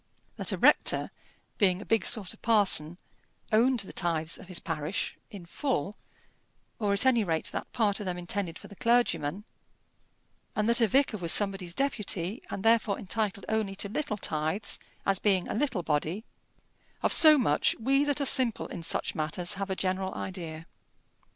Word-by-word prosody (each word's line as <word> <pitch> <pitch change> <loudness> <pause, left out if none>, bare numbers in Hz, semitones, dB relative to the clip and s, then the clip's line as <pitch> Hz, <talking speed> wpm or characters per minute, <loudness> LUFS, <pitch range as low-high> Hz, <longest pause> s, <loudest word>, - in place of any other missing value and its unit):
That - - -1
a - - -2
rector, - - +3 0.5
being 185 -4 +3
a 205 - -9
big 225 -2 +1
sort 210 -6 -1
of - - -21
parson, 190 -7 +3 0.5
owned 235 +2 +3
the 195 - -9
tithes 165 -2 -1
of 190 - -13
his 185 -2 -1
parish 160 +3 -4
in 200 -6 -10
full, 210 - -3 0.8
or 205 -3 0
at 200 +5 +3
any 245 -4 +4
rate 165 -4 -1
that - - -6
part 210 -4 +1
of 205 - -6
them 180 -1 -2
intended 175 -1 -4
for - - -12
the 200 - -13
clergyman, 200 -7 +1 1.1
and 210 0 0
that 235 +1 +4
a 225 - +5
vicar 265 -1 +2
was 170 -4 -1
somebody's 195 -4 0
deputy, 210 -6 -1
and 195 - -5
therefore 225 -3 +3
entitled 200 -1 -3
only 215 -3 -1
to 200 - -3
little 215 -2 -3
tithes, 160 +2 -3 0.3
as 195 -1 +1
being 190 -4 +1
a - - -4
little 240 -7 -1
body: 160 +8 -2 0.8
of - - +2
so 310 -2 +9
much 150 - +1
we 270 +5 +2
that 290 -1 0
are 280 - 0
simple 255 -4 +4
in 175 - -7
such 165 - -1
matters 165 +2 -1
have 195 0 -5
a 190 - -1
general 190 0 -2
idea. 165 -4 -6
200 Hz, 175 wpm, -28 LUFS, 175-225 Hz, 1.1 s, so